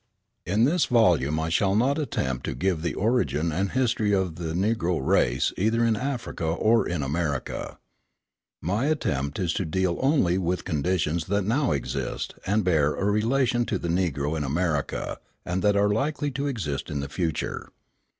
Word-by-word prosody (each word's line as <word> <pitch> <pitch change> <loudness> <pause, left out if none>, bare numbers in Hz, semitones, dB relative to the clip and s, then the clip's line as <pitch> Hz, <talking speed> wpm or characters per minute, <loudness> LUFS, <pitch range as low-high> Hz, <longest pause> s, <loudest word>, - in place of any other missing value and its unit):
In 100 +5 +2
this 155 +6 +3
volume 85 - +3
I 80 +1 -1
shall 95 +3 +2
not 135 +7 +2
attempt 65 - -2
to - - -3
give 90 -4 0
the 85 -1 -2
origin 100 -8 +1
and 95 +5 0
history 120 -4 +1
of 95 -4 0
the 80 -2 -3
Negro 90 -3 +1
race 65 -1 +2
either 115 +4 +2
in 115 -1 +2
Africa 125 -8 -3
or 110 +8 +2
in 85 -4 -1
America. 70 -1 -3 0.9
My 100 - 0
attempt 70 - -1
is 90 -3 0
to - - -1
deal 90 +1 -1
only 130 - +3
with 90 -1 -1
conditions 80 0 0
that 100 0 0
now 130 +6 +1
exist 70 -4 -3
and 105 +2 +2
bear 75 -5 +2
a - - -2
relation 120 +4 +2
to - - 0
the 85 - -4
Negro 80 -4 0
in 75 - -2
America 75 0 -1 0.3
and 90 +1 -1
that 105 0 +3
are 100 +1 +3
likely 145 +4 -1
to 140 +2 -2
exist 90 - -3
in 75 - -3
the 70 - -4
future. 80 +1 -3
95 Hz, 170 wpm, -26 LUFS, 80-115 Hz, 0.9 s, this